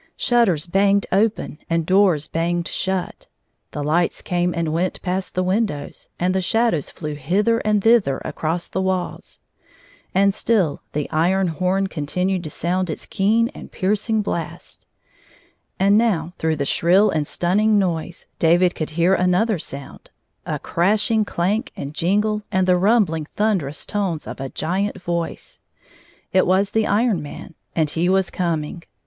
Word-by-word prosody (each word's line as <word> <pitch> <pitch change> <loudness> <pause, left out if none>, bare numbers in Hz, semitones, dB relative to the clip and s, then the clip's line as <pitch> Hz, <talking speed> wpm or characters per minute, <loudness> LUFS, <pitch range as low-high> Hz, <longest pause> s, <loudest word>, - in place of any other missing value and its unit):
Shutters 210 -11 +2
hanged 200 +1 +3
open 205 -5 0
and 165 -1 +1
doors 185 -5 +3
hanged 170 +1 0
shut. 190 -1 -3 0.4
The 145 - -5
lights 165 +4 0
came 175 0 0
and 165 -2 -2
went 175 +3 -1
past 185 +1 -3
the 185 - +1
windows, 190 -5 -2
and 180 +1 +1
the 190 - +1
shadows 225 - +1
flew 155 -2 -6
hither 195 +11 +1
and 210 -2 +1
thither 225 - +4
across 165 +2 -3
the 190 - -2
walls. 190 -1 -3 0.7
And 200 +1 +4
still 190 -9 +1
the 150 0 -2
iron 180 +4 +2
horn 185 +4 0
continued 180 +2 -2
to - - -4
sound 180 +4 -1
its 155 - -5
keen 220 +3 +2
and - - -11
piercing 210 +3 0
hlast. 170 -5 -6 0.9
And 200 +2 +5
now, 180 -8 0
through 160 0 +1
the 140 -2 -2
shrill 190 +8 +3
and 155 -2 -1
stunning 210 +5 +2
noise, 170 -3 -2
David 175 +2 +4
could 155 - -4
hear 175 +3 +4
another 180 +3 +2
sound 140 -2 -9 0.2
— - - -48
a - - -1
crashing 210 +4 +1
clank 205 +9 -1
and 140 +1 -6
jingle 210 +6 +1
and 185 0 +1
the 180 - +5
rumhling 180 -5 +2
thunderous 185 -10 0
tones 190 -7 -2
of - - -7
a 135 0 -4
giant 190 +9 -2
voice. 170 -2 -4 0.7
It 185 - +4
was 190 +2 +2
the 220 -1 +1
Iron 210 -4 +2
Marij 150 +3 -9 0.2
and 155 -3 +1
he 170 +2 0
was 190 -1 +2
coming. 170 -2 -2
185 Hz, 155 wpm, -21 LUFS, 165-205 Hz, 0.9 s, And